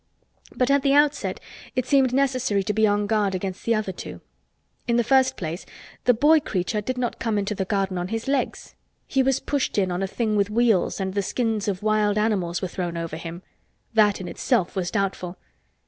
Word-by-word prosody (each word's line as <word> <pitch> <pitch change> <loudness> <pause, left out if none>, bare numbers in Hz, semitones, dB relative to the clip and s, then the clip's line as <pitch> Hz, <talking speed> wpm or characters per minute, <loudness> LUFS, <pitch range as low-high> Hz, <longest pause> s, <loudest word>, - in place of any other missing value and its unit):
But 250 +1 +2
at 280 0 +4
the 275 +1 +3
outset 290 0 +2 0.4
it 255 -2 0
seemed 265 -1 +3
necessary 255 -6 +1
to 210 - -1
be 220 +1 +3
on 205 0 +1
guard 205 -2 +1
against 185 0 -5
the 230 - +3
other 215 -3 -1
two. 180 - -8 0.7
In 235 - +2
the 240 - +3
first 265 +1 +3
place 170 +1 -4 0.4
the 245 - +6
boy 300 +7 +5
creature 210 -4 -2
did 255 +4 -3
not 245 -1 -2
come 225 -2 0
into 205 +1 -1
the 190 -2 -2
garden 195 -2 -1
on 175 - -3
his 225 +4 -4
legs. 275 -1 -2 0.3
He 270 - +1
was 265 -1 +2
pushed 285 -6 -2
in 190 -3 +2
on 175 +1 -2
a 195 - 0
thing 215 +1 -1
with 200 -1 +2
wheels 220 -4 +2
and 190 -1 -2
the 200 - +1
skins 220 0 -1
of 195 -1 -2
wild 215 -1 +2
animals 195 -5 0
were - - 0
thrown 175 -2 -4
over 165 -2 -4
him. 170 +2 -7 0.5
That 210 -2 +4
in 185 - -6
itself 200 +1 0
was 180 -2 -1
doubtful. 190 -3 -2
210 Hz, 210 wpm, -24 LUFS, 190-250 Hz, 0.7 s, the